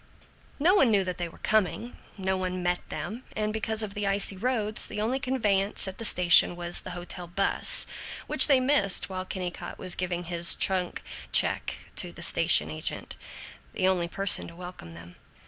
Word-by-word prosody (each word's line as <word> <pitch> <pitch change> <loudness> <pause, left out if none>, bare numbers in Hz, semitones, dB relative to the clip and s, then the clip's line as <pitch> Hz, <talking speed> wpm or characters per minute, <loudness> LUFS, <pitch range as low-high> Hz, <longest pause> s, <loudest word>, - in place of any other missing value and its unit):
II - - -27 0.4
No 350 +5 +4
one 275 - +4
knew 205 -3 +2
that 180 -1 -5
they 175 -1 -3
were - - -17
coming; 220 +3 0 0.2
no 190 -1 -1
one 185 -1 -4
met 175 0 0
them; 230 +5 -6
and 215 0 -2
because 220 0 -2
of 205 -2 -6
the 205 -1 -3
icy 200 0 +1
roads, 215 0 0
the - - -6
only 235 +5 -1
conveyance 210 -8 0
at 190 - -8
the 230 - -3
station 175 -2 +5
was 175 0 -2
the 180 -1 -8
hotel 175 0 -7
'bus, 195 +3 +1 0.4
which - - +8
they 275 -4 +5
missed 255 -9 +2
while 185 -1 -5
Kennicott 180 -2 -6
was 185 - -1
giving 180 -1 -3
his 170 0 +2
trunk 185 -2 -1 0.3
check - - +1 0.2
to - - -1
the - - -8
station 75 +1 +2
agent 80 - -5 0.6
the 185 - 0
only 180 -2 +1
person 195 +2 +2
to 170 - -13
welcome 175 - -10
them. 85 +1 -13
190 Hz, 185 wpm, -27 LUFS, 175-215 Hz, 0.6 s, which